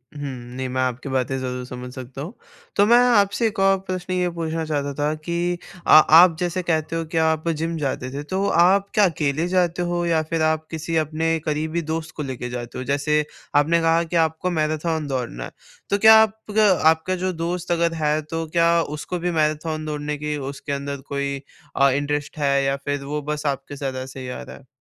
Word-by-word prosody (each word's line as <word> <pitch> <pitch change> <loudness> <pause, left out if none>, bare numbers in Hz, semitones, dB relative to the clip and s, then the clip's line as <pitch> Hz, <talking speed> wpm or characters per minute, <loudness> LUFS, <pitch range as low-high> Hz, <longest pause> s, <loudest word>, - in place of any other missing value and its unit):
हुँ। 145 - -7 0.4
नहीं, 130 0 -2
मैं 130 +1 -1
आपकी 130 +2 -2
बातें 130 0 -1
ज़रूर 125 -1 -4
समझ 125 0 -8
सकता 130 +1 -8
हूँ। 170 +9 -6 0.4
तो 205 - +5
मैं 235 +3 +6 0.2
आपसे 205 +3 +3
एक 210 - -5
और 195 0 +4
प्रश्न 185 0 -3
ये 180 -1 +1
पूछना 165 0 -2
चाहता 145 -2 -2
था 150 +1 +1
कि 170 +3 -2 0.3
अ, - - -2
आप 160 +2 +8
जैसे 180 0 -1
कहते 160 -1 -1
हो 165 0 -2
कि 160 +1 -4
आप 160 0 +1
जिम 165 +1 -2
जाते 135 -3 -2
थे। 145 +1 -4
तो 190 +6 -2 0.2
आप 195 +1 +3
क्या 210 - +5
अकेले 155 0 -1
जाते 180 -1 +1
हो 175 0 -1
या 165 -2 +2
फिर 165 -1 0
आप 155 0 +1
किसी 160 +1 -3
अपने 160 +1 0
करीबी 155 +2 -1
दोस्त 160 0 -4
को 150 - -4
लेके 130 -3 -5
जाते 120 0 -6
हो? 130 - -4
जैसे 145 +3 +1 0.3
आपने 155 +4 +4
कहा 165 +1 +3
कि 170 +1 -5
आपको 160 +3 -4
मैराथन 155 -1 -1
दौड़ना 125 - -3
है, - - -8 0.4
तो 200 - +2
क्या 220 +2 +8
आपका 215 0 +2 0.2
आपका 160 +3 +1
जो 185 +1 -1
दोस्त 170 +1 -3
अगर 170 -1 +2
है 155 -1 0
तो 165 +2 -4
क्या 170 +1 +3 0.3
उसको 175 +4 -4
भी 175 +1 -1
मैराथन 155 0 -1
दौड़ने 150 -1 -3
के 150 0 -3
उसके 140 +1 -6
अंदर 140 0 -4
कोई 140 0 -2 0.4
अ, 140 0 +5
इंटरेस्ट 145 +2 -2
है 140 -2 +2
या 135 0 +1
फिर 145 -1 -2
वो 150 +2 -3
बस 150 +1 -4
आपके 140 0 -3
साथ 135 -1 -3
ऐसे 135 0 -9
ही 130 -1 -6
आ 125 - -6
रहा - - -10
है? 135 - -20
155 Hz, 210 wpm, -22 LUFS, 140-170 Hz, 0.4 s, आप